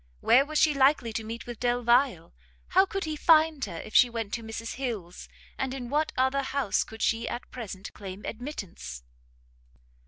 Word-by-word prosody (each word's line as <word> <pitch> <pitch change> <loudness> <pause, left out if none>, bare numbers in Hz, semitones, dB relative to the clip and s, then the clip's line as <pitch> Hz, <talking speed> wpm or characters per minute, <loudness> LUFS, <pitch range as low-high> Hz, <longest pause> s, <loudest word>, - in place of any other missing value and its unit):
where 255 - +5
was 305 +2 -3
she 305 0 +5
likely 270 -4 +3
to 220 - -3
meet 230 +1 -6
with 240 -2 -7
Delvile? 240 -6 +2 0.4
how 380 +1 +5
could 390 0 -3
he 310 -1 -3
find 310 -2 +4
her 175 -5 -7
if 215 - -11
she 245 - +7
went 225 -3 -4
to 235 - -2
Mrs 225 +1 -6
Hill's? 220 -10 -5 0.3
and 265 0 -2
in 245 -2 -6
what 305 +2 +1
other 260 +2 +2
house 265 -5 0
could 220 0 -7
she 230 0 +1
at 240 - -6
present 200 -6 -7
claim 195 0 -8
admittance? 195 - -7
245 Hz, 180 wpm, -28 LUFS, 220-275 Hz, 0.4 s, she